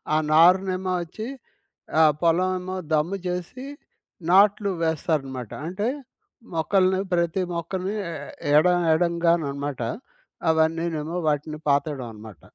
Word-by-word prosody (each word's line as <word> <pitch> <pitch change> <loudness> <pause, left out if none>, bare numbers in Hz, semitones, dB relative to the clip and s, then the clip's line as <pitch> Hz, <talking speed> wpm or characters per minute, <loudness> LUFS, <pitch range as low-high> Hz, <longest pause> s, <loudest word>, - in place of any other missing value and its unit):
ఆ - - +4 0.2
నారునేమో 185 +3 +4
అచ్చి, 215 +7 -7 0.7
ఆ - - +8 0.2
పొలం 170 +2 +3
ఏమో 185 +1 -5 0.2
దమ్ము 160 +6 +1
చేసి, 180 +9 -5 0.7
నాట్లు 200 +1 +5
వేస్తారన్నమాట. 140 -6 -1 0.2
అంటే 205 +6 -2 0.7
మొక్కల్ని, 185 +3 +2
ప్రతి 170 +2 +1
మొక్కల్ని, 185 +4 -3 0.2
ఎ - - -5 0.4
ఎడ 155 +4 +5 0.3
ఎడంగానన్నమాట. 160 -5 0 0.7
అవన్నీనేమో 160 0 0
వాటిని 150 +1 -1
పాతడం 140 -1 +1
అన్నమాట. 105 -3 -12
170 Hz, 100 wpm, -24 LUFS, 155-185 Hz, 0.7 s, ఆ